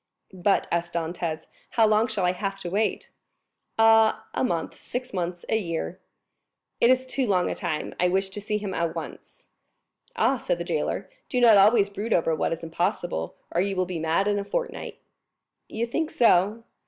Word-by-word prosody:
"But," 190 +2 +1
asked 170 0 -1
Dantès, 165 -1 -3 0.3
"how 225 - +6
long 215 +1 +3
shall 210 -5 -1
I 180 - +3
have 195 +1 -4
to 175 - -5
wait?" 215 +3 -1 0.7
"Ah, 225 0 +5
a - - 0
month—six 245 +5 -3
months—a 175 +3 -2
year." 170 -2 -3 0.8
"It 235 - +5
is 255 0 +3
too 260 0 -1
long 180 -3 +2
a - - -1
time. 170 -5 -3
I 180 - +4
wish 190 +2 0
to 205 +2 -7
see 210 +1 -1
him 200 -2 -4
at 170 -2 -1
once." - - -9 0.7
"Ah," - - +2
said - - -1
the - - -3
jailer, - - -2 0.2
"do 250 - 0
not 235 -3 +7
always 205 +1 +6
brood 205 +3 -3
over 165 -1 +2
what 155 - 0
is 165 0 -4
impossible, 170 - -2 0.2
or 175 - +1
you 195 +1 -1
will 185 0 +1
be 180 -2 -4
mad 165 +5 +1
in 205 0 +1
a - - -3
fortnight." - - -4 0.7
"You 225 +2 -2
think 315 +7 -2
so?" 215 0 +3
195 Hz, 180 wpm, -26 LUFS, 175-220 Hz, 0.8 s, not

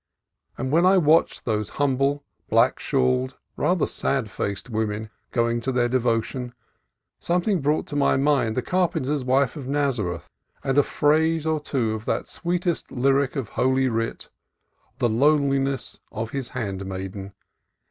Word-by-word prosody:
And 130 +1 -3
when 165 +3 +4
I 190 +1 +6
watched 160 -1 +3
these 105 -3 -1
humble, 140 +1 +1 0.3
black - - +3
shawled, 65 0 0 0.2
rather - - +1
sad - - -2
faced 100 +3 -3
women 110 -1 -2 0.2
going 115 0 +1
to 130 - -1
their 125 -1 +2
devotions, 120 0 -1 0.7
something 180 +1 +1
brought 150 +3 +1
to 145 - -7
my 140 -2 +3
mind 135 -5 +2
the 130 - 0
car 180 +5 +2
penter's 140 +1 -2
wife 130 +1 +2
of 140 -4 -7
Nazareth, 120 - -1 0.4
and 135 -1 0
a - - +8
phrase 160 +3 +2
or 160 -1 +1
two 125 -6 -1
of 110 0 -6
that - - -1
sweetest 175 0 -2
lyric 135 +2 +1
of 130 -7 -3
Holy 130 +1 +2
Writ 115 -1 -3 0.3
— - - -42
"the 120 - +2
lowliness 135 +1 +1
of 115 +1 -4
His 135 -3 -4
handmaiden 95 -3 -5
130 Hz, 150 wpm, -24 LUFS, 115-145 Hz, 0.7 s, a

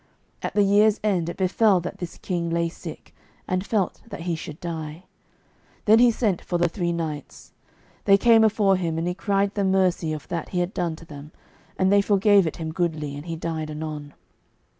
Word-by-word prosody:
At - - -4
the 205 - +5
year's 205 +2 +4
end 180 -6 +1
it - - -6
befell 190 +1 +3
that 180 - -6
this 175 -2 -6
king 170 -2 -3
lay 170 0 0
sick, 165 -1 -10 0.3
and 185 0 0
felt 200 -2 -1
that 230 - -8
he 175 0 -2
should 155 -1 -8
die. 160 -1 -6 0.8
Then 220 +2 +6
he 245 0 +7
sent 215 -6 0
for 175 - -1
the 175 0 +2
three 170 0 -2
knights. 160 -4 -5 0.5
They 195 0 +6
came 225 +1 +5
afore 205 -3 +3
him, 165 -3 -2
and 165 +1 -1
he 180 - 0
cried 195 +1 0
them 200 -2 0
mercy 185 -4 +1
of 155 -2 -6
that 170 -2 -3
he 180 - -2
had 175 +3 -1
done 170 -2 -1
to 165 - -14
them, 150 -1 -11 0.5
and 190 0 +2
they 200 - +6
forgave 200 -2 +4
it - - -4
him 160 -1 -4
goodly, 155 -4 -2
and 145 +4 -8
he 165 - -3
died 160 -1 -4
anon. 150 -1 -6
175 Hz, 205 wpm, -24 LUFS, 160-200 Hz, 0.8 s, he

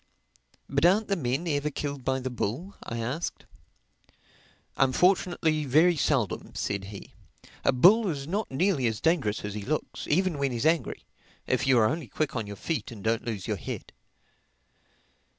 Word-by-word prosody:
"But 140 +2 0
aren't 200 +5 +4
the 200 - +2
men 140 +1 -1
ever 145 -1 0
killed 140 -2 -4
by 130 +1 0
the 130 0 -4
bull?" 125 - -3
I 115 - -5
asked. 125 +9 -3 1.3
"Unfortunately 160 +2 +2
very 160 +6 +5
seldom," 135 - 0
said 100 -1 -2
he. 100 0 -10 0.5
"A - - +4
bull 195 - +6
is 140 -4 -4
not 200 +5 -2
nearly 140 -2 +1
as 110 -2 -2
dangerous 125 -12 +1
as 105 - -4
he 105 - -4
looks, 150 +9 -3
even 170 -1 +1
when 140 -1 +1
he's 120 +3 -2
angry, 160 0 +1 0.4
if - - 0
you 130 -2 +5
are 110 - +5
only 155 +2 -2
quick 150 +6 -2
on 115 -4 -2
your 100 - -6
feet 160 - -3
and 110 -5 -10
don't 115 0 0
lose 105 -6 -4
your - - -1
head. - - -7
140 Hz, 170 wpm, -28 LUFS, 115-165 Hz, 1.3 s, bull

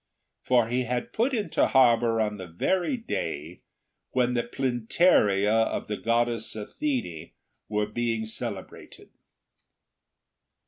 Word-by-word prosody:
For 120 -3 +3
he 125 +2 0
had 120 +1 -3
put 240 +5 +1
into 210 -10 +1
harbour 120 -3 +4
on 105 -1 0
the 95 -2 -8
very 180 - 0
day 80 - -4 0.5
when 125 -1 +2
the 120 - +1
Plynteria 120 - +2
of - - -4
the 105 - -2
goddess 115 -1 0
Athene 105 - -4 0.4
were 105 0 0
being 115 +1 -2
celebrated. 110 - -7
115 Hz, 110 wpm, -27 LUFS, 105-130 Hz, 0.5 s, harbour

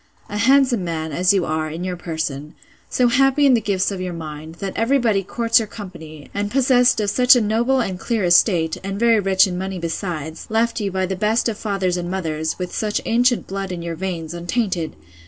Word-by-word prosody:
A 210 - -4
handsome 255 -2 +3
man, 160 -2 -3
as 180 +5 +3
you 195 -4 +1
are, 155 0 -2
in 165 +3 -6
your 185 -1 -3
person; 160 -4 -5 0.3
so 250 - +2
happy 270 +3 +3
in 270 - +5
the 235 - +3
gifts 200 -1 0
of 190 -2 -5
your 180 -1 -4
mind, 155 0 -8
that 195 +2 -5
every 245 +5 +2
body 220 -6 +1
courts 230 +5 +2
your 220 - -3
company; 165 -8 -10
and 205 0 -2
possessed 250 -1 +3
of 205 -2 0
such 250 +4 +6
a - - +4
noble 235 +5 +1
and 190 -5 -3
clear 225 -1 -1
estate; 175 -2 +3
and 195 +1 -4
very 230 -1 +4
rich 190 -1 +4
in 180 -2 -4
money 190 0 -4
besides, 165 -2 -5
left 230 +2 +1
you 200 -1 -2
by 190 0 -1
the 190 +1 -3
best 215 +5 +1
of 230 - -2
fathers 195 -4 -1
and 175 0 -4
mothers, 160 -4 -3
with 180 -1 -5
such 210 -1 -1
ancient 245 +1 +2
blood 195 -1 -5
in 175 -2 -5
your 170 -1 -4
veins, 170 -2 -4
untainted! 175 - -2
190 Hz, 215 wpm, -20 LUFS, 170-225 Hz, 0.3 s, such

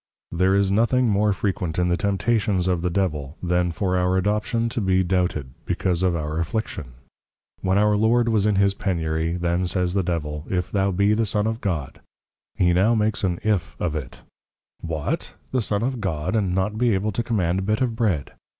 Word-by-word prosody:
There 95 +3 +2
is 100 -1 +2
nothing 120 +4 +3
more 105 +1 +2
Frequent 95 -4 -2
in 90 0 +2
the 85 - +3
Temptations 100 -1 0
of 90 -2 +1
the 90 - 0
Devil, 80 -5 -2
then 90 0 +1
for 95 +2 -1
our 90 +1 +2
Adoption 105 +4 0
to 115 - -3
be 95 -1 +2
doubted, 90 -7 -1
because 90 -2 0
of 90 -2 +2
our 75 0 -2
Affliction. 85 - -3 0.7
When 95 +1 +1
our 105 0 +3
Lord 115 +3 +3
was 110 -3 +2
in 105 - +2
his 100 0 +3
Penury, 80 -4 -1
then 85 +1 0
says 90 -1 0
the 100 - +2
Devil, 75 -4 -3
If 90 -1 -1
thou 100 -1 +1
be 100 +3 +2
the 110 0 +1
Son 105 +1 0
of 110 +1 -2
God; 75 -9 -3 0.5
he 90 -1 +3
now 100 +7 +3
makes 105 -1 0
an 90 -3 +1
If, 105 -5 -1
of 85 -3 -1
it; 70 -6 -6 0.6
_What? 80 -3 -3 0.2
the 130 - +1
Son 105 0 -1
of 130 -2 -2
God, 90 0 -2
and 95 -5 +1
not 105 +3 -1
be 120 -4 +3
able 105 +3 -1
to 105 - -1
Command 95 -6 0
a - - -1
Bit 105 +4 0
of 120 -3 0
Bread! 100 - 0
95 Hz, 200 wpm, -23 LUFS, 85-105 Hz, 0.7 s, nothing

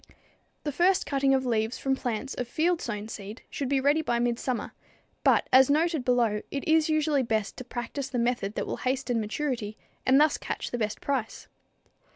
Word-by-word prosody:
The 295 - -2
first 360 +6 +3
cutting 275 -1 +2
of 260 -1 0
leaves 225 -1 0
from 270 -1 0
plants 250 +1 -3
of 245 - -4
field 335 +7 +1
sown 210 -2 -4
seed 210 +1 -8
should 275 -4 -3
be 275 -1 +2
ready 285 +4 +3
by 240 -6 0
midsummer, 240 +1 -1 0.5
but - - +4
as 260 +1 +7
noted 315 -1 +2
below 235 -4 +2
it 275 - -4
is 320 0 +4
usually 310 -2 +2
best 220 -4 -1
to - - -6
practice 255 +3 -5
the 255 - -3
method 235 -4 0
that - - -2
will - - -4
hasten 255 -2 -1
maturity 220 -1 -3 0.3
and 265 +1 +5
thus 305 0 +3
catch - - -4
the 245 - -2
best 215 -1 -2
price. 265 -6 -3
255 Hz, 190 wpm, -27 LUFS, 230-285 Hz, 0.5 s, as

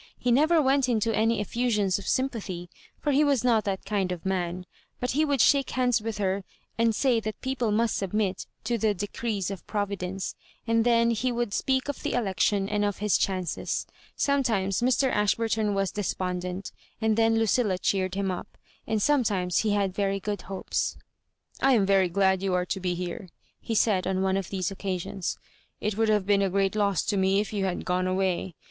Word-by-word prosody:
He 245 - 0
never 310 +7 +4
went 270 -2 +3
into 225 -1 +1
any 220 -1 +2
efiUsions 210 -5 0
of - - -9
sympathy, 205 -10 -2 0.3
for 295 - 0
he 285 +2 +4
was 280 -5 +2
not 230 -3 +3
that 195 -2 -3
kind 195 -2 -1
of 180 -1 -5
man; 180 -1 -2 0.3
but 250 - -1
he 300 +4 +2
would 285 -5 +2
shake 275 +3 +4
hands 245 -3 +1
with 220 -1 -4
her, 195 -1 -1 0.3
and 230 -1 +2
say 250 -3 +2
that 215 0 -5
people 260 -3 -1
must 225 +2 +1
submit 195 0 -1 0.2
to 235 +1 -1
the 210 -1 +2
decrees 205 0 -3
of 195 - -8
Providence; 195 -2 -3 0.3
and 230 0 +2
then 235 -1 +4
he 235 +3 0
would 240 -3 -2
speak 265 +3 0
of 285 - -4
the - - -2
election 200 -3 +1
and 210 0 0
of 205 -1 0
his 210 -1 +1
chances. 185 -3 -1 0.3
Some 280 0 +2
times 195 -6 0
Mr. 255 +1 +2
Ashburton 210 0 +1
was 195 -1 0
despondent, 180 -2 -3 0.3
and 220 -1 +2
then 225 0 +3
LudUa 225 -3 +2
cheered 185 -1 0
him 195 -1 0
up; 180 - -7 0.3
and 220 -1 0
sometimes 205 -9 +2
he 220 - +1
had 200 -2 0
very 195 0 0
good 205 0 -3
hopes. 195 -1 -2 0.3
" - - -27
I 270 0 +5
am 210 -5 +4
very 195 -2 +3
glad 190 +1 +2
you 195 -2 0
are 180 0 +1
to 190 - -3
be 180 -1 -1
here," 180 +1 -5 0.3
he 225 - -3
said 200 -4 +2
on 190 0 0
one 190 0 +1
of 195 -2 -2
these 190 -1 -2
occasions. 190 -1 -3
^' - - -33 0.3
It 210 -1 -2
would 220 +1 +1
have 210 -3 +2
been 200 0 +3
a 195 - +2
great 195 +1 +1
loss 200 -4 +1
to 205 - -1
me 190 +1 +3
if 210 +1 -3
you 200 -2 0
had 185 -2 -3
gone 180 0 0
away. 185 -2 -1
205 Hz, 205 wpm, -27 LUFS, 190-230 Hz, 0.3 s, I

